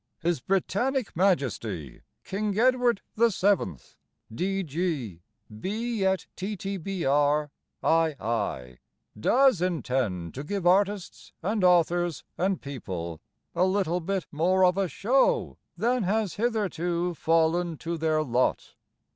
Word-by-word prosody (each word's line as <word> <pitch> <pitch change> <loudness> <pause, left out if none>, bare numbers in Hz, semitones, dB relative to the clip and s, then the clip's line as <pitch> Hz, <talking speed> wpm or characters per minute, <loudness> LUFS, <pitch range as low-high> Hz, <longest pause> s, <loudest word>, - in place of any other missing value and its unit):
His 170 -2 +1
Britannic 205 - -1
Majesty 115 - -1 0.2
King 205 +1 -2
Edward 245 -2 +3 0.2
VII., 200 - +2 0.6
D.G.: 165 - -2 0.4
B. 220 - -2
et 190 0 +1
T.T.B.R.: 165 -7 0 0.3
I.I., 115 - 0 0.4
Does 255 - +4
intend 125 - -1
to 140 - -6
give 195 +3 -3
artists 195 +1 +1
and 205 +2 0
authors 175 -2 +3
and 190 +1 0
people 90 - -6 0.3
A 175 - +2
little 185 -2 +1
bit 190 +1 -2
more 185 +5 +3
of 180 0 +3
a 195 -1 +1
show 250 +11 +1 0.2
Than 245 +2 +1
has 205 0 0
hitherto 180 -6 -1
fallen 165 +1 +1
to 165 +2 -4
their 155 -1 +1
lot. 125 -2 0
175 Hz, 105 wpm, -27 LUFS, 150-200 Hz, 0.6 s, Does